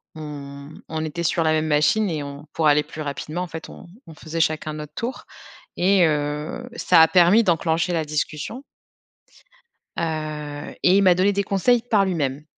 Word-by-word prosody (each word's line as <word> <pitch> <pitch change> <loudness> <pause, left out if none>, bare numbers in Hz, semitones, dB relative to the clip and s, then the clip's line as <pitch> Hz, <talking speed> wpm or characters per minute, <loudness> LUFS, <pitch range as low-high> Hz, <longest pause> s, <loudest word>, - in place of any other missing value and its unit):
on 140 -2 -8 0.2
on 160 0 -3
était 165 +2 -4
sur 165 0 +1
la 155 - +2
même 155 0 +1
machine 155 +8 +2
et 155 -3 -3
on 140 +1 -9
pour 160 -2 +1
aller 150 0 +4
plus 155 - -9
rapidement, 155 +3 -4
en 180 - -3
fait 160 -1 -8
on - - -12 0.2
on 165 - -11
faisait 155 +1 -6
chacun 155 -1 0
notre 150 -1 -8
tour 245 +2 -5 0.5
et, 185 -1 +4
heu, 150 +10 -3
ça 175 -3 +5
a 160 - +7
permis 185 +5 +5
d'enclencher 170 -1 +1
la 160 -2 0
discussion 150 - -4 1.3
heu, 155 -2 -4
et 185 +2 +5
il 200 - +4
m'a 180 -2 +5
donné 190 +3 +3
des 200 +1 0
conseils 225 +5 +2
par 215 -4 +2
lui-même. 150 -5 -2
160 Hz, 180 wpm, -22 LUFS, 150-180 Hz, 1.3 s, a